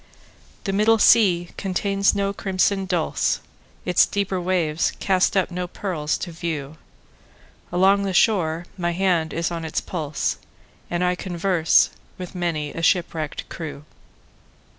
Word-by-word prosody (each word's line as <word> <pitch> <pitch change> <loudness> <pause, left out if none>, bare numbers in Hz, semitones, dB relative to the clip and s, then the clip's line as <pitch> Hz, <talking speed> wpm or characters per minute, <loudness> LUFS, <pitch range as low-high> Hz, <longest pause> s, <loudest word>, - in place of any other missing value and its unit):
The 195 - -2
middle 215 +3 +4
sea 180 -6 +4
contains 195 +1 +1
no 200 0 0
crimson 195 0 0
dulse, 175 -4 0 0.5
Its 180 -1 +4
deeper 195 -2 -1
waves 170 -4 0
cast 190 0 +2
up 185 -1 +1
no 180 0 -3
pearls 175 -5 -2
to 175 - -9
view; 160 -3 -5 0.9
Along 190 +3 +4
the 200 -1 -1
shore 175 -4 +2
my 175 -1 0
hand 175 -3 +1
is 170 +1 -2
on 165 -1 -4
its 160 - -2
pulse, 155 -5 -3 0.5
And 175 +1 -1
I 180 0 +2
converse 175 -2 +2 0.3
with 180 -1 -7
many 165 -5 -2
a 165 - -5
shipwrecked 165 -3 0
crew. 150 -4 -7
180 Hz, 135 wpm, -23 LUFS, 165-195 Hz, 0.9 s, middle